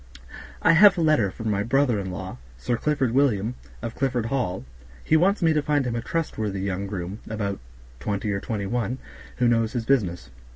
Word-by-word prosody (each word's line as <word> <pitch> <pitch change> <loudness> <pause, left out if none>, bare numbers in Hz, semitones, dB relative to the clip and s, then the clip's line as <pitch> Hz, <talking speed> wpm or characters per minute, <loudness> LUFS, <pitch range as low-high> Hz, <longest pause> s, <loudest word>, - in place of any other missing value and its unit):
I - - +6
have 195 +3 +7
a - - +1
letter 155 -11 +3
from 110 +3 -4
my 100 0 0
brother 125 0 +2
in 95 -1 -4
law, 90 -8 -6 0.2
Sir 120 - -1
Clifford 135 -1 0
Williams, 120 -4 +2 0.3
of 115 -1 -4
Clifford 130 -4 -1
Hall. 115 - -2 0.4
He - - +2
wants 185 +4 +3
me 160 -1 +4
to 150 - +2
find 145 -2 +1
him 120 -1 -2
a 115 - -2
trustworthy 110 - -2
young 100 0 -2
groom, 95 +1 -5
about 100 -2 -3 0.4
twenty 105 - -2
or 100 - -1
twenty 105 -5 -3
one, 120 +3 -1 0.4
who 125 - +2
knows 115 -1 +2
his 120 -3 -2
business. 90 - 0
115 Hz, 195 wpm, -25 LUFS, 100-140 Hz, 0.4 s, have